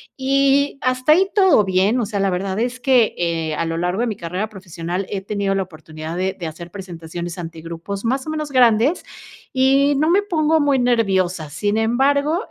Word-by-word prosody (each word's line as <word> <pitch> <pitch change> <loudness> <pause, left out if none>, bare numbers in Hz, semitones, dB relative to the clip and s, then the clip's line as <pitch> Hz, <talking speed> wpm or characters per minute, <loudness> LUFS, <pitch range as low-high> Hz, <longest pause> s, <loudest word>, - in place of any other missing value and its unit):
y 275 +1 +2
hasta 255 +2 +1
ahí 375 +5 +5
todo 375 - +5
bien. 195 +6 +2
O 225 - 0
sea, 200 -1 -3
la 195 - +2
verdad 190 +1 -2
es 245 +2 -2
que, 250 -4 +3
eh, 165 -2 -1
a 165 - -1
lo 165 0 -3
largo 180 +4 -1
de 245 - +1
mi 220 - -3
carrera 180 +4 -4
profesional 180 -2 -5
he 200 - -2
tenido 200 0 -2
la 195 -1 -1
oportunidad 155 -1 -9
de 185 +1 -1
de 170 - -5
hacer 165 +2 -7
presentaciones 175 -2 -7
ante 165 -1 -7
grupos, 170 +6 -6
más 265 +4 -1
o - - -3
menos, 305 -2 -4
grandes, 250 +4 +3 0.5
y 275 +2 +3
no 310 +3 +2
me 390 +3 +4
pongo 320 -5 +1
muy 285 -2 +2
nerviosa, 190 - +1
sin 205 +8 -1
embargo, 280 - +2
205 Hz, 195 wpm, -20 LUFS, 175-270 Hz, 0.5 s, ahí